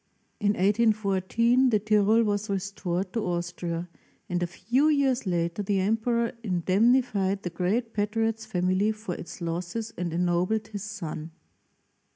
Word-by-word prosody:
In 205 Hz, -2 st, +2 dB
1 185 Hz, -, -4 dB, 0.2 s
8 225 Hz, -2 st, +5 dB
14 225 Hz, +6 st, +2 dB
the 220 Hz, -, +4 dB
Tyrol 215 Hz, +2 st, +3 dB
was 205 Hz, 0 st, -1 dB
restored 190 Hz, -1 st, -2 dB
to 230 Hz, -, -1 dB
Austria, 175 Hz, -1 st, -3 dB, 0.4 s
and 180 Hz, -3 st, -1 dB
a 175 Hz, -, 0 dB
few 240 Hz, -, +1 dB
years 270 Hz, -6 st, +2 dB
later 170 Hz, +1 st, 0 dB
the 200 Hz, -1 st, 0 dB
emperor 225 Hz, +4 st, +1 dB
indemnified 200 Hz, +1 st, +2 dB
the 175 Hz, -, -3 dB
great 220 Hz, +7 st, -1 dB
patriot's 225 Hz, +1 st, -1 dB
family 185 Hz, +1 st, +1 dB
for 215 Hz, -4 st, -6 dB
its 175 Hz, -, -9 dB
losses 175 Hz, +7 st, -3 dB
and 175 Hz, -2 st, -2 dB
ennobled 180 Hz, +5 st, 0 dB
his 205 Hz, -2 st, -6 dB
son. 170 Hz, -7 st, -6 dB
205 Hz, 145 wpm, -27 LUFS, 180-225 Hz, 0.4 s, 8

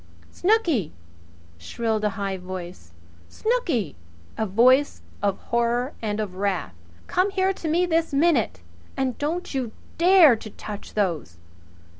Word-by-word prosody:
"Snooky!" 350 Hz, -, +1 dB, 0.7 s
shrilled 220 Hz, -, -2 dB
a 210 Hz, -, +3 dB
high 195 Hz, -1 st, -2 dB
voice. 180 Hz, -, -8 dB, 0.4 s
"Snooky!" 335 Hz, -, -1 dB, 0.4 s
A 220 Hz, -, -1 dB
voice 255 Hz, +8 st, +4 dB, 0.2 s
of 200 Hz, -1 st, +1 dB
horror 235 Hz, +3 st, 0 dB
and 210 Hz, -1 st, -2 dB
of 205 Hz, -4 st, -3 dB
wrath. 190 Hz, -, -1 dB, 0.3 s
"Come 365 Hz, +3 st, +1 dB
here 385 Hz, -1 st, +1 dB
to 340 Hz, -, -6 dB
me 340 Hz, +3 st, +2 dB
this 330 Hz, -2 st, +1 dB
minute! 275 Hz, -, +2 dB, 0.4 s
And 260 Hz, -2 st, 0 dB
don't 325 Hz, +4 st, -2 dB
you 255 Hz, -4 st, -2 dB, 0.3 s
dare 345 Hz, -6 st, +7 dB
to 220 Hz, 0 st, -9 dB
touch 210 Hz, 0 st, -9 dB
those!" 170 Hz, -, -1 dB
235 Hz, 130 wpm, -24 LUFS, 200-330 Hz, 0.7 s, dare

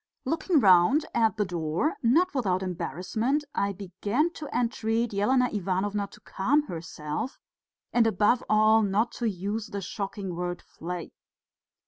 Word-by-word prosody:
Looking 325 Hz, 0 st, +2 dB
round 195 Hz, -, +5 dB
at 225 Hz, -2 st, +2 dB
the 210 Hz, -, +1 dB
door, 170 Hz, -, -1 dB
not 310 Hz, +10 st, +3 dB
without 190 Hz, -9 st, 0 dB
embarrassment, 185 Hz, -, -1 dB
I 200 Hz, -, 0 dB
began 205 Hz, -, -1 dB
to 305 Hz, -, -7 dB
entreat 230 Hz, -2 st, -1 dB
Elena 250 Hz, +6 st, +3 dB
Ivanovna 200 Hz, +1 st, -1 dB
to -, -, -16 dB
calm 280 Hz, +10 st, +1 dB
herself, 165 Hz, -, -5 dB, 0.6 s
and 235 Hz, -2 st, +4 dB
above 220 Hz, +4 st, +2 dB
all 215 Hz, +1 st, +5 dB
not 210 Hz, +3 st, +1 dB
to 235 Hz, -, +2 dB
use 205 Hz, +3 st, -3 dB
the 200 Hz, -, -5 dB
shocking 195 Hz, -1 st, -5 dB
word 175 Hz, 0 st, -3 dB
"flay." 175 Hz, +1 st, -7 dB
205 Hz, 135 wpm, -27 LUFS, 185-240 Hz, 0.6 s, round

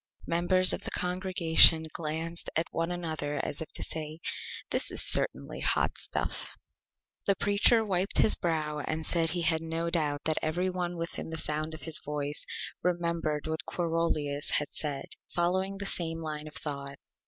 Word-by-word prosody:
Members 185 Hz, +2 st, +4 dB
of -, -, -3 dB
the -, -, -2 dB
Congregation 180 Hz, -3 st, +5 dB
glanced 165 Hz, +1 st, -4 dB
at 160 Hz, -, +2 dB
one 165 Hz, +1 st, -1 dB
another 160 Hz, -4 st, -3 dB
as 145 Hz, -, -3 dB
if 160 Hz, -, -4 dB
to -, -, -2 dB
say: 155 Hz, 0 st, -2 dB, 0.5 s
"This -, -, +2 dB
is -, -, -2 dB
certainly -, -, +2 dB
Hot -, -, +1 dB
Stuff!" -, -, -3 dB, 0.7 s
The 200 Hz, -, +4 dB
Preacher 205 Hz, +4 st, +4 dB
wiped 190 Hz, -1 st, 0 dB
his 215 Hz, -, +6 dB
Brow 155 Hz, -3 st, -1 dB
and 155 Hz, +2 st, -3 dB
said 165 Hz, -2 st, +2 dB
he 170 Hz, +1 st, 0 dB
had 160 Hz, 0 st, +3 dB
no 165 Hz, +1 st, -2 dB
Doubt 150 Hz, -4 st, 0 dB
that 155 Hz, -1 st, +2 dB
every 175 Hz, +4 st, 0 dB
one 175 Hz, -1 st, -3 dB
within 165 Hz, -1 st, -4 dB
the 160 Hz, -, -4 dB
Sound 155 Hz, 0 st, -1 dB
of 160 Hz, -, -11 dB
his 160 Hz, -2 st, +1 dB
Voice 145 Hz, 0 st, -2 dB, 0.3 s
remembered 170 Hz, -4 st, -1 dB
what 160 Hz, -1 st, -2 dB
Quarolius 165 Hz, -4 st, -1 dB
had 150 Hz, -, +1 dB
said, 145 Hz, -3 st, -4 dB, 0.2 s
following 190 Hz, +3 st, 0 dB
the 200 Hz, -, -5 dB
same 165 Hz, -4 st, -2 dB
Line 155 Hz, -1 st, -4 dB
of 155 Hz, -, -10 dB
Thought. 140 Hz, -2 st, -4 dB
165 Hz, 165 wpm, -29 LUFS, 155-175 Hz, 0.7 s, his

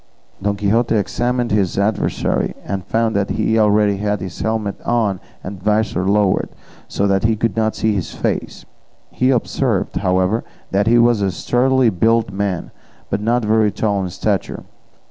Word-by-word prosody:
Don 100 Hz, +1 st, 0 dB
Quixote 110 Hz, +4 st, +1 dB
examined 120 Hz, +3 st, -1 dB
his 100 Hz, -4 st, +1 dB
adversary, 100 Hz, +1 st, 0 dB
and 95 Hz, -2 st, -3 dB
found 115 Hz, +2 st, 0 dB
that 100 Hz, 0 st, 0 dB
he 110 Hz, 0 st, +1 dB
already 105 Hz, -1 st, +3 dB
had 105 Hz, 0 st, -1 dB
his 90 Hz, -1 st, -7 dB
helmet 110 Hz, -2 st, -2 dB
on 110 Hz, -6 st, 0 dB, 0.2 s
and 95 Hz, 0 st, -7 dB
visor 105 Hz, -2 st, 0 dB
lowered, 100 Hz, -2 st, +2 dB, 0.4 s
so 100 Hz, -, -1 dB
that 95 Hz, -1 st, +1 dB
he 110 Hz, 0 st, +3 dB
could 110 Hz, -2 st, -1 dB
not 110 Hz, -1 st, 0 dB
see 110 Hz, -1 st, +1 dB
his 95 Hz, -5 st, -3 dB
face; -, -, -3 dB, 0.5 s
he 125 Hz, -, +1 dB
observed, 125 Hz, -3 st, 0 dB
however, 95 Hz, +4 st, +1 dB, 0.3 s
that 100 Hz, +2 st, +1 dB
he 120 Hz, +1 st, +5 dB
was 120 Hz, -2 st, +4 dB
a 100 Hz, -, +1 dB
sturdily 125 Hz, +5 st, +2 dB
built 110 Hz, +3 st, +2 dB
man, 95 Hz, -2 st, -3 dB, 0.4 s
but 100 Hz, -, -1 dB
not 115 Hz, +1 st, +1 dB
very 110 Hz, -1 st, +3 dB
tall 100 Hz, -2 st, -1 dB
in 95 Hz, -, -3 dB
stature. -, -, -2 dB
105 Hz, 165 wpm, -19 LUFS, 100-115 Hz, 0.5 s, he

